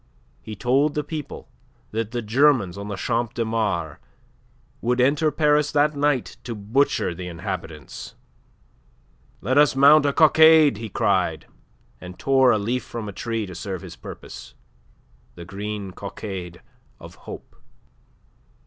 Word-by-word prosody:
He 110 - -8
told 135 +7 +1
the 150 - -1
people 150 0 -7 0.4
that 110 0 -2
the 120 0 -4
Germans 120 -5 +3
on 100 +1 -7
the 105 - -4
Champ 120 +3 -2
de 115 - -1
Mars 100 -9 -2 0.8
would 125 +2 0
enter 140 +5 +3
Paris 150 0 +2
that 150 0 +2
night 145 -3 0
to 120 -1 -5
butcher 110 -1 0
the 90 +1 -7
inhabitants. 85 -3 -7 1.3
"Let 130 +3 +2
us 150 -2 +4
mount 145 +2 +6
a - - +2
cockade!" 160 -4 +6
he 110 0 -6
cried, - - 0 0.5
and 90 0 -10
tore 135 -1 +3
a 110 - +3
leaf 120 +5 -2
from 115 -3 -7
a 100 - -6
tree 115 +1 -3
to 95 - -9
serve 95 0 -6
his - - -9
purpose - - -11 0.8
the 85 - -10
green 100 +1 -6
cockade 95 -2 -7 0.4
of - - -12 0.2
hope. - - -10
115 Hz, 140 wpm, -23 LUFS, 100-140 Hz, 1.3 s, mount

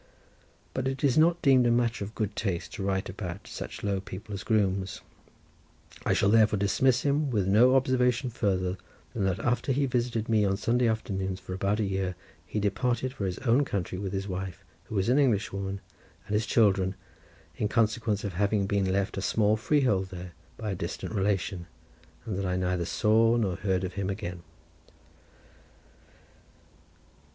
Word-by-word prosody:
But 130 0 -1
it 135 +1 -3
is 135 -4 +3
not 170 +2 +4
deemed 130 -4 +5
a - - +3
matter 120 -2 +1
of 105 +3 -8
good 105 -1 -2
taste 95 -6 -3
to - - -6
write 95 0 -1
about 95 0 -6
such - - -7
low 100 -2 0
people 100 +2 -8
as 100 - -4
grooms, 100 -3 0 1.1
I - - +4
shall 100 - +3
therefore 110 -1 +5
dismiss 120 +6 +2
him 145 +1 +1
with 105 -6 0
no 120 +7 +5
observation 125 -1 +2
further 95 -4 0 0.4
than 100 -4 -1
that 95 -1 +1
after 125 +5 0
he 135 +2 +1
had 135 - -1
visited 120 -2 0
me 110 -2 +3
on 95 -1 +1
Sunday 120 +4 +2
afternoons 95 -4 -2
for 95 - -7
about 100 +3 0
a - - +2
year 95 -2 -1 0.3
he 105 - -2
departed 120 +5 0
for 100 -7 -3
his 90 - -3
own 125 +4 +4
country 95 -7 -3
with 100 -2 -3
his 100 0 -3
wife, 95 -2 -5 0.2
who - - -7
was 95 0 +1
an 130 +4 +4
Englishwoman, 100 -6 0 0.4
and 105 - -5
his 110 +2 +1
children, 95 -4 +3 0.6
in 105 - 0
consequence 110 -1 +1
of 100 -3 -3
having 100 +2 +1
been 100 -1 +1
left 100 0 -1
a - - -1
small 105 +1 +2
freehold 110 -6 +1
there 90 -1 -8 0.3
by 110 -2 -3
a - - -2
distant 85 +5 -5
relation, 95 -3 -1 0.6
and 100 -4 -3
that 100 - -2
I 90 - 0
neither 90 -1 0
saw 115 +5 +3
nor 100 -6 0
heard 95 -2 0
of 90 -1 -3
him 100 -1 -2
again. 90 -4 -5
105 Hz, 180 wpm, -28 LUFS, 95-115 Hz, 1.1 s, deemed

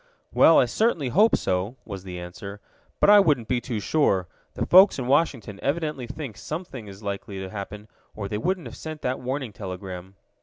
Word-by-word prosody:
"Well, - - +7
I - - +6
certainly 180 - 0
hope 210 - +4
so," 95 +6 -1
was 100 -3 -7
the 90 -2 -7
answer. 100 +3 -8 0.4
"But - - +6
I 205 - +9
wouldn't 145 - +2
be 125 -1 0
too 120 -4 -3
sure. 100 - +1 0.3
The - - -1
folks 190 +3 +7
in 130 - -3
Washington 130 -7 +1
evidently 150 -3 -2
think 130 -4 -7
something 150 - -6
is 100 +2 -11
likely 100 0 -5
to 95 -1 -6
happen, 105 +1 -7 0.3
or 100 -2 -4
they 105 +1 -3
wouldn't 185 - -1
have - - -8
sent 155 -1 -8
that 125 +1 -1
warning 130 -2 -4
telegram." 95 -1 -7
115 Hz, 190 wpm, -25 LUFS, 100-150 Hz, 0.4 s, I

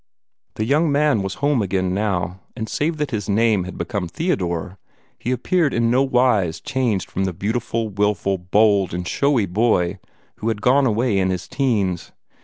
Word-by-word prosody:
The 110 - -1
young 150 +5 +2
man 145 -6 +2
was 95 0 -3
home 145 -5 +2
again 95 -2 -1
now, 95 -3 -1 0.2
and 110 -2 -4
save 155 +6 -1
that 150 -2 -2
his 105 -4 -3
name 105 -2 +2
had 95 - -8
become 100 -6 -3
Theodore, 90 - -2 0.4
he - - -4
appeared 145 +4 +1
in 115 0 +2
no 130 +2 +3
wise 125 -10 +2
changed 120 -8 -1
from 95 - -1
the 95 - -2
beautiful, 110 +4 -2
wilful, 100 -1 0
bold, 100 0 +2
and 90 0 -4
showy 140 -7 +2
boy 95 -2 +1 0.4
who 110 - -4
had 110 -2 0
gone 130 +5 +3
away 110 -2 +1
in 95 0 +1
his 90 -2 -3
teens. 100 -10 -1
105 Hz, 175 wpm, -21 LUFS, 95-125 Hz, 0.4 s, no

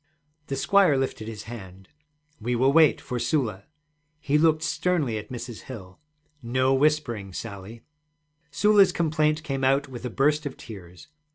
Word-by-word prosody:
The 135 - -3
squire 185 +1 +3
lifted 130 -5 -3
his 110 -2 -7
hand. 95 -5 -10 0.5
'We 120 +3 -2
will 130 +3 +3
wait 160 -1 +5
for 125 -1 -5
Sula.' 120 -6 -1 0.5
He 145 -1 -1
looked 160 0 +3
sternly 165 -9 0
at - - -11
Mrs. 120 -2 -8
Hill. 95 -7 -10 0.4
'No 130 +2 +1
whispering, 135 -9 0
Sally!' 110 +2 -8 0.7
Sula's 205 +4 +4
complaint 155 -1 0
came 135 -2 -3
out 135 +1 +2
with 125 -2 -9
a 125 - -3
burst 150 +5 +1
of 135 - -9
tears. 90 -2 -12
130 Hz, 150 wpm, -25 LUFS, 110-150 Hz, 0.7 s, wait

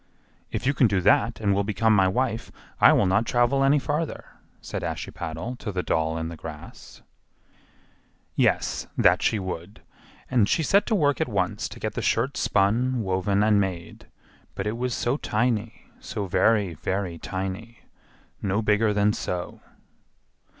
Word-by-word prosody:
"If - - -4
you 140 - +3
can 130 - +4
do 100 -3 +1
that 105 +4 +3
and 100 -2 +1
will 100 +1 +1
become 110 +2 +2
my 95 -2 +4
wife, 115 +3 -1 0.3
I - - +8
will - - +3
not 100 +4 +2
travel 120 +3 +2
any 140 +2 +4
farther," 145 +4 -2 0.3
said - - -5
Ashiepattle 80 +11 -5
to 110 - -5
the 90 -2 -2
doll 80 0 0
in 80 0 -3
the 85 - -7
grass. 80 -1 -11 1.3
Yes, - - +1
that - - +4
she 110 - +2
would, 95 0 -6 0.5
and 115 -6 +2
she 165 - +2
set 200 +7 +3
to 220 - +2
work 145 - +2
at - - 0
once - - -1
to - - -11
get - - -3
the - - -3
shirt - - 0
spun, 115 +5 +1
woven, 95 +1 +1
and 105 -1 +4
made; 90 -3 -5 0.5
but 95 - -4
it 105 +2 -1
was 125 0 -2
so 120 +4 0
tiny, 110 -4 -1
so 100 - -5
very, 100 0 +2
very 90 +1 -3
tiny, 95 +6 -5 0.6
no 100 +3 0
bigger 105 0 +2
than—so! 100 -3 -1
105 Hz, 160 wpm, -25 LUFS, 95-120 Hz, 1.3 s, I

